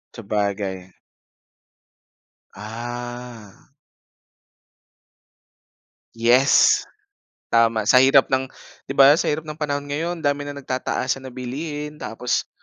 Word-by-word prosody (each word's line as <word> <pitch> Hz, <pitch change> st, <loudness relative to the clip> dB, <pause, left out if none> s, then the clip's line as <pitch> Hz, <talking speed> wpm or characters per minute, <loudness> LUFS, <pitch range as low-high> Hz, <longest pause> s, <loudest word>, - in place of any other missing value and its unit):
Sabagay. 100 Hz, -4 st, -3 dB, 1.6 s
Ah! 120 Hz, 0 st, -8 dB, 2.5 s
Yes! 135 Hz, -, +4 dB, 0.7 s
Tama! 115 Hz, -1 st, +3 dB
Sa 125 Hz, +5 st, +5 dB
hirap 135 Hz, +1 st, +5 dB
ng, 130 Hz, 0 st, +1 dB, 0.4 s
'di -, -, -4 dB
ba, 140 Hz, +1 st, +8 dB
sa -, -, -1 dB
hirap 150 Hz, +1 st, -1 dB
ng 155 Hz, 0 st, -9 dB
panahon 145 Hz, -2 st, -2 dB
ngayon, 165 Hz, +3 st, -3 dB
dami 145 Hz, 0 st, 0 dB
ng 145 Hz, -, -6 dB
nagtataasan 130 Hz, +1 st, -2 dB
na -, -, -9 dB
bilihin 150 Hz, +4 st, -6 dB
tapos 120 Hz, +2 st, -2 dB
130 Hz, 95 wpm, -22 LUFS, 115-145 Hz, 2.5 s, ba